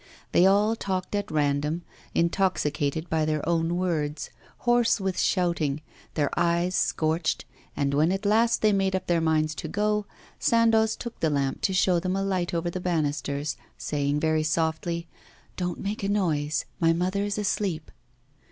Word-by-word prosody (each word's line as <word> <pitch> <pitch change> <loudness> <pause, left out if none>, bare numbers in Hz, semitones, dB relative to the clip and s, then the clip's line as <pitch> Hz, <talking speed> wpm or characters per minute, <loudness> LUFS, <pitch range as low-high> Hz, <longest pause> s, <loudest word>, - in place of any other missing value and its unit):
They 180 - +5
all 205 +3 +3
talked 190 -3 -3
at 205 0 -1
random, 150 +2 0 0.3
intoxicated 160 -4 0
by 160 -1 +1
their 155 -1 -1
own 170 0 +1
words, 155 -5 -2 0.3
hoarse 240 -2 +3
with 190 -2 -2
shouting, 170 -6 +1 0.4
their 145 -3 +1
eyes 170 +1 +1
scorched, 160 -2 0 0.3
and 140 -1 0
when 155 +5 +3
at 195 +2 -2
last 225 +3 +3
they 215 -1 +5
made 195 -1 +1
up 185 - -2
their 170 -1 +1
minds 155 -1 +1
to 160 - -6
go, 210 +3 0 0.3
Sandoz 225 -1 +3
took 235 -1 -8
the 160 - +2
lamp 140 -2 -1
to - - +1
show 180 -2 +3
them 185 +2 -1
a 195 - 0
light 185 -3 -1
over 170 0 -1
the 185 - -4
banisters, 150 -3 -1 0.2
saying 145 0 -1
very 155 0 +2
softly: 160 +2 -1 0.5
'Don't 180 -2 -3
make 205 +2 -3
a 195 - -1
noise, 160 -7 0
my 165 -1 +4
mother 185 +4 0
is 205 0 -2
asleep. 195 -6 -1
170 Hz, 160 wpm, -26 LUFS, 155-195 Hz, 0.5 s, They